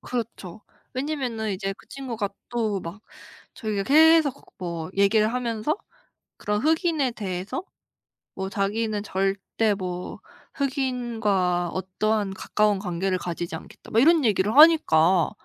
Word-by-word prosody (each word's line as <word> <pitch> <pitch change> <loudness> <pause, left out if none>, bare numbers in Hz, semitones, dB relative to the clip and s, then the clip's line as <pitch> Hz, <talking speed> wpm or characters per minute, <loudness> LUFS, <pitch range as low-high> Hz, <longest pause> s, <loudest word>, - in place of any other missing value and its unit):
그렇죠. 220 -5 -5 0.3
왜냐면은 255 -5 -2
이제 195 +1 -3
그 - - -19
친구가 235 -7 -4 0.2
또 220 -5 -1
막 170 +5 -8 0.5
자기가 215 -3 -2
계속 310 0 +5
뭐 170 -2 -5
얘기를 215 +2 +3
하면서 245 - -1 0.6
그런 210 0 -1
흑인에 315 -5 +1
대해서 195 - -4 0.7
뭐 190 0 -4
"자기는 210 +1 -1
절대 195 +2 0
뭐 180 -2 -5 0.3
흑인과 230 - 0
어떠한 195 +2 -1
가까운 210 +1 +1
관계를 185 0 -1
가지지 175 -1 -5
않겠다." - - -13
뭐 225 - +4
이런 315 +1 +5
얘기를 210 +2 +1
하니까 185 - +6
215 Hz, 270 characters per minute, -25 LUFS, 190-250 Hz, 0.7 s, 하니까